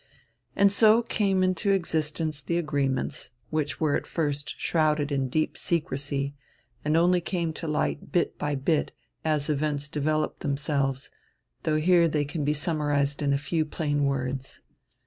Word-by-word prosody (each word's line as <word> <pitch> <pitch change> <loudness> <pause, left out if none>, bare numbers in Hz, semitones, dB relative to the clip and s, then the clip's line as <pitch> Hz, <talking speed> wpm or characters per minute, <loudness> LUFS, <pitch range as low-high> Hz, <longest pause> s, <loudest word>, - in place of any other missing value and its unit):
And 200 0 +5
so 220 +3 +5
came 195 -4 +1
into 185 +2 +1
existence 155 -4 -1
the 170 +5 -1
agreements, 140 -5 -1 0.2
which 150 -3 -1
were 155 -3 +2
at - - -2
first 145 -3 -2
shrouded 155 -3 +1
in 135 -2 0
deep 155 +4 0
secrecy 140 -3 -2 0.5
and 150 +2 +2
only 175 +1 +4
came 170 -2 -2
to 165 - -6
light 155 -1 -1
bit 175 - +1
by 145 0 -1
bit, 145 +3 0 0.3
as 155 -2 0
events 145 -1 -1
developed 155 +1 -1
themselves, 140 -1 -1 0.5
though 155 -1 +2
here 170 +1 +5
they 150 -2 0
can 145 +2 -3
be 150 +1 +1
summarized 145 -2 0
in 140 -1 +1
a 140 - +3
few 150 +3 0
plain 145 -2 -1
words. 135 -1 -2
150 Hz, 150 wpm, -27 LUFS, 140-165 Hz, 0.5 s, And